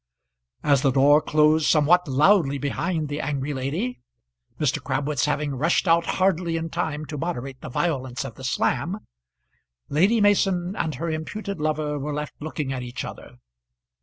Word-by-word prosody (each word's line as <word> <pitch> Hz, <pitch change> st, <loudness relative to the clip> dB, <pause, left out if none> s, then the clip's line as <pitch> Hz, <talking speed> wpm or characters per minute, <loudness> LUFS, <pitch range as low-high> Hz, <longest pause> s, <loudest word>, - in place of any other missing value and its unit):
As 140 Hz, -3 st, +3 dB
the 140 Hz, -, +3 dB
door 140 Hz, +3 st, +5 dB
closed 155 Hz, +1 st, +3 dB
somewhat 170 Hz, +3 st, +4 dB
loudly 145 Hz, +1 st, +3 dB
behind 155 Hz, +4 st, -2 dB
the 145 Hz, +1 st, -3 dB
angry 145 Hz, 0 st, -2 dB
lady 155 Hz, -, -3 dB, 0.6 s
Mr. -, -, 0 dB
Crabwitz 140 Hz, -1 st, 0 dB
having 150 Hz, -1 st, -1 dB
rushed 160 Hz, +8 st, +1 dB
out 170 Hz, 0 st, +3 dB
hardly 180 Hz, -3 st, +1 dB
in 165 Hz, 0 st, -4 dB
time 155 Hz, -3 st, -2 dB
to 150 Hz, -1 st, -6 dB
moderate 135 Hz, -6 st, -4 dB
the -, -, -7 dB
violence 130 Hz, -4 st, -2 dB
of -, -, -7 dB
the -, -, -12 dB
slam -, -, -1 dB, 0.8 s
Lady 190 Hz, +10 st, +3 dB
Mason 195 Hz, -3 st, +2 dB
and 155 Hz, -7 st, -2 dB
her 165 Hz, +5 st, -3 dB
imputed 195 Hz, +5 st, -5 dB
lover 150 Hz, -1 st, -1 dB
were 145 Hz, +1 st, -3 dB
left 150 Hz, 0 st, -4 dB
looking 150 Hz, -3 st, -3 dB
at 130 Hz, -, -4 dB
each 125 Hz, 0 st, -5 dB
other. -, -, -10 dB
150 Hz, 160 wpm, -24 LUFS, 140-170 Hz, 0.8 s, door